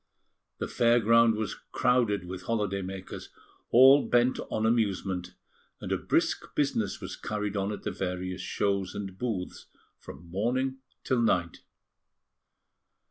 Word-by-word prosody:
The - - -3
fair 120 0 +3
ground 115 0 +5
was 110 -1 -3
crowded 115 -7 0
with 90 +1 -6
holiday 105 -4 -1
makers, 95 0 -7 0.4
all 135 +3 +7
bent 120 +1 +2
on 110 - -1
amusement, 95 -5 0 0.4
and - - -6
a - - +2
brisk - - -1
business 115 -8 0
was - - -6
carried 105 -1 -4
on 100 +1 -1
at 105 - -6
the 105 - -2
various 90 0 -4
shows 100 +1 -1
and 95 -2 -5
booths 95 -4 -4 0.3
from 80 +6 -11
morning 130 +7 -1 0.2
till 125 -2 +1
night. 90 -7 0
105 Hz, 135 wpm, -28 LUFS, 95-115 Hz, 0.4 s, all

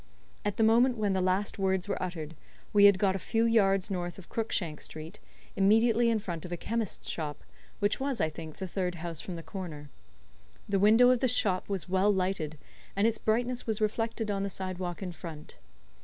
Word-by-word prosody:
At 205 -1 -2
the 225 - +3
moment 240 +3 +4
when 205 -2 +1
the 190 - +1
last 185 +3 0
words 190 -1 +1
were 205 - -2
uttered 165 -4 -4 0.4
we 205 -1 +7
had 200 -2 +7
got 190 -1 +2
a - - -2
few 225 +4 +1
yards 195 -4 +3
north 175 -2 -3
of 190 - -12
Crookshank 180 -9 -2
Street, 160 +6 -8 0.4
immediately 225 +4 +4
in 230 - +2
front 175 -6 -5
of 180 - -8
a 175 - -2
chemist's 225 +2 -3
shop 150 -3 -4 0.3
which 205 0 0
was, 270 -2 -1
I - - +3
think, 155 0 -8
the 190 - -4
third 180 -1 -2
house 165 -2 -6
from 180 +3 -6
the 165 - -7
corner. 155 -8 -7 0.8
The 200 -1 +1
window 225 +5 +6
of 250 - +3
this 250 -1 +2
shop 190 -4 0
was 190 -6 -2
well 190 +3 +3
lighted, 185 -5 -1 0.4
and 200 +2 +2
its 225 -1 +1
brightness 240 +3 0
was 220 -2 -1
reflected 225 0 -1
on 195 -1 -1
the 200 - -1
sidewalk 185 -1 -4
in 180 - -4
front. 165 - -10
195 Hz, 200 wpm, -30 LUFS, 175-220 Hz, 0.8 s, we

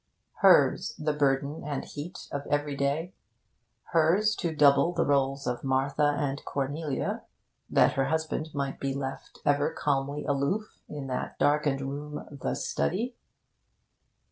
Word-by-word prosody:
Hers - - +5
the 150 0 0
burden 140 +1 0
and 145 -2 -3
heat 165 +6 -8
of 140 0 -4
every 145 0 0
day, 145 +6 -1 0.8
hers 175 +7 +4
to 170 -3 -1
double 145 +3 +5
the 170 - +1
roles 135 -1 +1
of 125 -1 -2
Martha 135 +2 +2
and 140 -1 -2
Cornelia, 145 +1 -2 0.5
that - - +4
her 135 - +1
husband 160 0 -1
might 140 -1 -3
be 135 -1 -2
left 135 -1 -5
ever 145 0 +3
calmly 140 0 -1
aloof 145 +10 -1
in 145 -2 -5
that 130 -1 -4
darkened 145 -2 +2
room, 145 +2 -5
the 140 -2 -3
Study. 230 +8 -1
145 Hz, 135 wpm, -28 LUFS, 140-155 Hz, 0.8 s, Hers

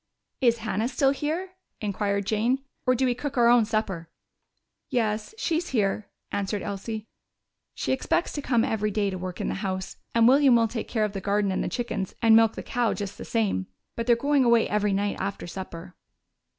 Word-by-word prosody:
"Is 235 -2 +4
Hannah 220 0 -1
still 270 +1 +2
here?" 320 +6 -2 0.3
inquired 200 -1 -1
Jane. 235 +6 +1 0.2
"Or 255 - +5
do 260 +2 +1
we 250 - +2
cook 280 +2 -5
our 235 -1 +5
own 240 -2 +6
supper?" 200 -7 -2 0.8
"Yes, 220 - -1
she's 340 -4 -1
here," 210 -3 0 0.2
answered 200 0 -2
Elsie. 210 +2 -4 0.7
"She - - -2
expects 265 +6 0
to 290 - -3
come 240 -5 +2
every 215 -1 0
day 205 -1 0
to 185 - -5
work 185 -1 -5
in - - -2
the - - -1
house, 190 -2 -3 0.2
and 230 0 +6
William 270 0 +6
will 230 -1 +4
take 225 0 -5
care 220 -3 +1
of 205 - -4
the 195 - -4
garden 200 0 +1
and 190 - -1
the - - -2
chickens 225 -6 -3
and 225 -1 +6
milk 225 -1 +5
the - - -6
cow 245 -3 0
just 200 -2 -6
the - - -6
same. 205 - 0 0.3
But 230 0 -3
they're 240 - +6
going 280 +3 +2
away 235 -2 +4
every 210 0 +1
night 200 +1 0
after 200 - -3
supper." 175 -1 -8
220 Hz, 200 wpm, -26 LUFS, 200-245 Hz, 0.8 s, own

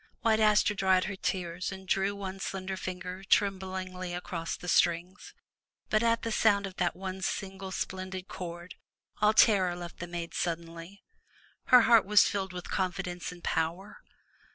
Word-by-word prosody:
White 220 -2 +3
Aster 210 -1 +4
dried 190 -2 +3
her 200 - -4
tears 180 -1 -3
and 190 0 -9
drew 195 +2 +1
one 195 -1 -6
slender 190 0 -4
finger 185 0 -6
trem 195 0 +2
blingly 185 -1 -5
across 170 -2 -4
the 180 - -10
strings. 175 +2 +1 0.6
But 215 - +3
at 230 0 +2
the 230 - -2
sound 205 -2 +3
of 190 -1 -8
that 175 - 0
one 190 0 -6
single 190 +1 -4
splendid 185 0 -4
chord, 175 0 -7 0.5
all 210 0 +5
terror 190 -5 +5
left 175 -1 -8
the 175 - -5
maiden 170 -1 -5
suddenly, 170 +2 -4 0.3
— - - -31
her 250 -1 +8
heart 225 -4 +5
was 210 0 +7
filled 195 -2 -2
with 180 -1 -7
confidence 180 -1 -2
and 175 -1 -13
power. 170 +6 -2
185 Hz, 165 wpm, -30 LUFS, 175-200 Hz, 0.6 s, her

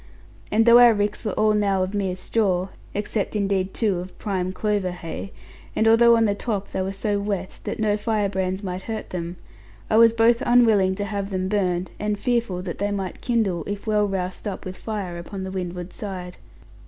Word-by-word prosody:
And 225 +1 +4
though 235 0 +8
our 240 -2 +7
ricks 205 0 -1
were 210 -4 -2
all 215 0 +3
now 200 -3 +2
of 185 +2 -4
mere 195 -3 -1
straw 190 -2 0 0.3
(except 210 0 -2
indeed 195 -2 0
two 205 -6 0
of 180 +1 -9
prime 185 -3 -2
clover 205 -1 0
hay), 175 +2 -6 0.4
and 220 - +2
although 235 +1 +6
on 225 - +3
the 205 - +2
top 205 -1 -3
they 190 - -2
were 190 +1 -2
so 205 +1 -1
wet 200 -2 -3
that - - -3
no 210 -1 +2
firebrands 200 -3 -1
might 185 -1 -4
hurt 220 +2 -5
them; 175 0 -4 0.5
I 220 - +4
was 230 0 +8
both 230 +1 +3
unwilling 220 -6 +4
to 205 +1 -3
have 200 -1 -3
them 185 -1 -2
burned, 185 -3 0
and 210 0 -1
fearful 230 -6 -1
that 175 -3 -5
they 205 +1 0
might 195 -2 -4
kindle, 210 -9 0
if 205 0 -5
well 210 -1 +2
roused 190 +1 -3
up 200 - -5
with 185 0 -5
fire 195 -6 -5
upon 190 +3 -6
the 190 - -5
windward 180 -1 -5
side. 185 -4 -6
200 Hz, 200 wpm, -23 LUFS, 185-215 Hz, 0.5 s, though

